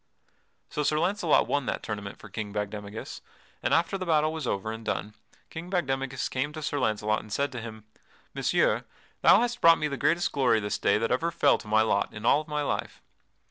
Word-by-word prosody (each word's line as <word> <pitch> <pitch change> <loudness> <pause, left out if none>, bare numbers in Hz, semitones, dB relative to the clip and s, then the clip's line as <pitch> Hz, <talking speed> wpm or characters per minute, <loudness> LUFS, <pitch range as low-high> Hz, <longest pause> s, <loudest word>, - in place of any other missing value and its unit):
So 150 - -2
Sir 150 +1 +1
Launcelot 180 -1 +2
won 145 -3 0
that - - -2
tournament 105 -2 -5
for - - -12
King 105 -2 -5
Bagdemagus, 105 +1 -5 0.4
and - - -1
after 170 +4 +2
the 185 - -3
battle 155 -1 +2
was 160 -5 -4
over 100 +1 -2
and 115 0 -7
done 105 -1 -3 0.4
King 170 +2 -7
Bagdemagus 135 -7 -1
came 135 +3 -2
to 155 -1 -6
Sir 145 -1 -1
Launcelot 110 -3 +1
and 110 - -14
said 140 +5 0
to 125 -3 -6
him: 110 -1 -9 0.5
"Messire, - - +1 0.4
thou 205 - +7
hast 240 0 -2
brought 165 0 +8
to - - -9
me 150 - +1
the 140 -2 -4
greatest 170 +7 +1
glory 125 -5 +3
this 105 -1 -3
day - - +3
that 115 +1 -1
ever 165 +7 +1
fell 145 -4 +3
to - - -12
my 110 +1 +4
lot 100 -2 +1
in 105 +1 -7
all 145 - +5
of 155 - -13
my 150 -1 -1
life. - - -3
135 Hz, 220 wpm, -27 LUFS, 110-155 Hz, 0.5 s, brought